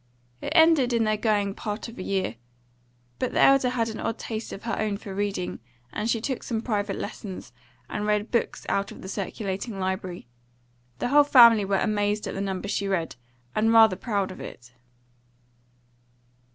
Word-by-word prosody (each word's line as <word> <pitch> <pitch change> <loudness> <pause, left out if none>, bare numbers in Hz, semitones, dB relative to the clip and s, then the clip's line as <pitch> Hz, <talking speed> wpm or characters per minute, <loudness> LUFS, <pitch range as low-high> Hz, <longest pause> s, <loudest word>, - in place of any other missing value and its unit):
It - - -4
ended 320 -7 +5
in 230 -1 +3
their 215 -1 +2
going 205 -2 +1
part 210 +2 -5
of 230 - -11
a - - -3
year. 185 - -2 0.8
But - - -1
the - - +1
elder 275 -2 +5
had 235 -2 0
an 220 - -6
odd 225 - -2
taste 220 -1 -5
of 195 - -8
her 230 - -2
own 210 -2 -1
for 200 -2 -8
reading, 200 -2 -2 0.3
and 220 - -2
she 230 - +1
took 255 +3 -3
some 230 -2 -2
private 205 -4 -1
lessons, 195 - -7 0.3
and 210 +10 -3
read 210 +1 0
books 235 - -1
out 200 0 -1
of - - -11
the - - -7
circulating 195 +1 -4
library; 185 - -3 0.7
the 190 - -2
whole 290 +2 +7
family 235 -7 +7
were 195 0 +1
amazed 210 0 0
at - - -4
the 195 - -3
number 195 0 -3
she 200 0 -1
read, 180 -4 -1 0.4
and 220 +1 +2
rather 220 -4 +7
proud 200 -3 -2
of - - -10
it. 120 0 -10
210 Hz, 180 wpm, -26 LUFS, 195-230 Hz, 0.8 s, whole